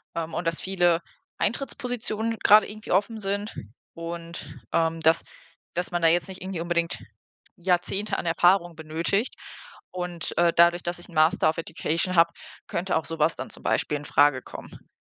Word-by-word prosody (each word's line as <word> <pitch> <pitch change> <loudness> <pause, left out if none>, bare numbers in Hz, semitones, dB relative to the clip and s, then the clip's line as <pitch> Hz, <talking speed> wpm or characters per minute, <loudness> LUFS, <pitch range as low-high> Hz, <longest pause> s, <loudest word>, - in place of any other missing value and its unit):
ähm, 165 -1 -3
und 175 - -2
dass 165 -1 -1
viele 175 -3 +2 0.4
Eintrittspositionen 230 -3 -2
grade 210 0 +7
irgendwie 215 0 -8
offen 205 +4 +1
sind 205 +1 -3 0.4
und, 170 0 -7
ähm, 165 0 +1
dass 160 +1 +3 0.5
dass 180 +1 -3
man 175 -1 -1
da 165 - +5
jetzt 175 +3 +3
nicht 190 -1 -10
irgendwie 185 -2 -4
unbedingt 170 0 -1 0.6
Jahrzehnte 180 +3 0
an - - -4
Erfahrung 175 +1 +3
benötigt. 165 +8 -1 0.6
Und, 180 -2 -4
äh, 170 -1 +5
dadurch, 170 +1 +5
dass 175 0 -2
ich - - -10
'n 175 - -15
Master 155 +1 +4
of 160 - -2
Education 165 +2 -1
habe, 170 0 +5 0.4
könnte 180 +2 -1
auch 160 -2 0
so 165 +1 -5
was 155 +2 +3
dann 130 - -6
zum - - -8
Beispiel 150 - +1
infrage 145 -2 +3
kommen. - - -11
175 Hz, 170 wpm, -26 LUFS, 165-190 Hz, 0.6 s, grade